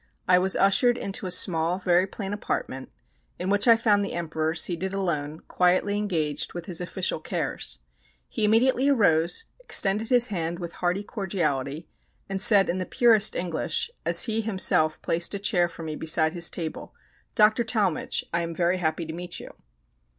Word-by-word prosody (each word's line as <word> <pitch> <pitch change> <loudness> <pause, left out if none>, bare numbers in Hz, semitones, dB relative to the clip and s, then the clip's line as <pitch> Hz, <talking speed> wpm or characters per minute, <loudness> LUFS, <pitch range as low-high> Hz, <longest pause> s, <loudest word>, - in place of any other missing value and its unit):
I 180 0 +5
was 190 +1 +2
ushered 240 +5 +3
into 195 -3 -5
a - - -4
small, 175 -1 +3
very 180 0 +2
plain 195 0 -6
apartment, 135 -9 -4 0.5
in 185 +2 -3
which 205 +3 +2
I 230 - +8
found 215 -3 +2
the 200 - -5
Emperor 160 -1 -2
seated 185 +3 -2
alone, 155 -5 -3
quietly 185 +3 +1
engaged 170 -8 -2
with 175 -1 -7
his 180 -2 -2
official 180 -2 -3
cares. - - -4 0.5
He 220 - -4
immediately 250 +5 +3
arose, 180 - +2
extended 215 - +1
his 245 -2 +5
hand 170 -3 -3
with 170 -1 -7
hearty 180 +3 0
cordiality, 160 - -3 0.4
and 195 -1 -3
said 200 -1 +5
in 180 - -2
the 185 - -3
purest 225 -4 +3
English, 175 - -2
as - - +5
he 225 -1 -1
himself 185 -7 +1
placed 170 +4 +1
a - - -1
chair 180 -4 +1
for 165 - -10
me 155 -1 -5
beside 160 0 +2
his 170 -1 +3
table, 165 -3 -7 0.4
"Doctor 215 +1 +4
Talmage, 210 -7 -1
I 170 - +1
am 165 0 -5
very 175 +2 +1
happy 165 0 -2
to 160 - -7
meet 175 +1 -6
you." - - -10
180 Hz, 170 wpm, -25 LUFS, 165-205 Hz, 0.5 s, I